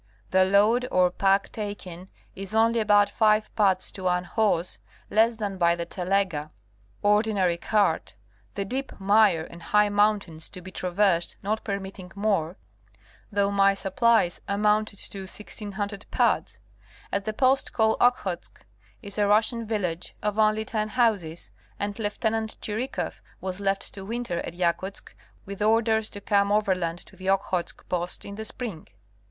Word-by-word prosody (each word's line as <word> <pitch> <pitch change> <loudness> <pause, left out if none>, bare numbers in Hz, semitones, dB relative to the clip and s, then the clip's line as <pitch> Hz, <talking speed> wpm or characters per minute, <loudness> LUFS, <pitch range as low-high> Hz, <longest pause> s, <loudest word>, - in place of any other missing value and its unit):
The 185 0 +5
load 210 +6 +3
or 180 -1 +4
pack 195 +2 +2
taken 190 -4 -6 0.3
is 195 +2 -5
only 230 +1 +4
about 205 -1 +5
five 215 +1 +2
puds 195 -3 +2
to 190 - -8
one 180 0 +2
horse, 180 -2 0 0.3
less 225 +2 +4
than 200 -3 -4
by 170 -1 +4
the 170 0 -4
telega 180 -5 -1 0.3
| 105 - -33
ordi 210 +1 +3
nary, 180 -3 +2
cart|, 210 +3 +1 0.4
the 200 - -2
deep 265 +5 -4
mire 200 -4 +4
and 170 +1 -11
high 210 +4 +3
mountains 205 -6 +1
to 185 - -8
be 185 +1 -10
traversed 180 -1 +1
not 215 +2 -1
permitting 195 -2 -5
more, 200 -5 0 0.7
though 200 -1 +1
my 195 0 +4
supplies 195 -1 +2
amounted 210 +1 +1
to 195 - -7
1600 205 0 -5
puds. - - +1 0.5
At 200 0 -1
the 215 - -1
post 260 +4 +2
called 220 -1 +2
Okhotsk 200 -8 0 0.4
is 200 0 -5
a 205 - +3
Russian 220 +2 +2
village 180 -6 -3
of 210 0 -1
only 215 0 +3
ten 215 -1 -2
houses, 205 -9 0 0.3
and 205 0 -2
Lieut. 220 +1 -1
Chirikoff 230 +6 -3 0.2
was 190 +1 -4
left 195 0 0
to 195 - -7
winter 225 -4 -3
at 170 - -6
Yakutsk 185 +2 -2 0.3
with 200 +1 -7
orders 220 0 +2
to 205 - -7
come 200 0 +2
overland 185 -5 +1
to - - -17
the 190 +1 -4
Okhotsk 190 -2 -1
post 175 0 -2
in 200 - -7
the 220 +2 -6
spring. 215 -8 -6
200 Hz, 155 wpm, -26 LUFS, 185-215 Hz, 0.7 s, The